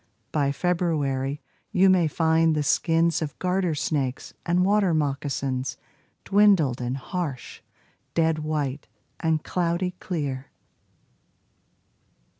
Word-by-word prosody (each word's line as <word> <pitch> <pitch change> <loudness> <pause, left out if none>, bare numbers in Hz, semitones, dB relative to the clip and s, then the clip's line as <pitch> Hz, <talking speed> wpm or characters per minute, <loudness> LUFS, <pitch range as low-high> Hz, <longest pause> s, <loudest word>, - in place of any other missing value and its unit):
By 140 -2 +1
February 145 -4 -1 0.3
you 190 +1 +4
may 185 -3 +4
find 160 +1 +2
the 150 - 0
skins 165 +3 +2
Of 150 -2 -4
garter 180 -3 0
snakes 140 -4 -2
and 180 +2 +3
water 195 -4 +3
moccasins 140 -3 -2 0.5
Dwindled 195 -11 +4
and 125 +2 -2
harsh, 145 -2 -5 0.5
dead 160 -1 +2
white 150 -3 -2 0.3
and 160 -2 0
cloudy 180 +1 -1
clear. 140 -7 -3
160 Hz, 100 wpm, -25 LUFS, 140-175 Hz, 0.5 s, you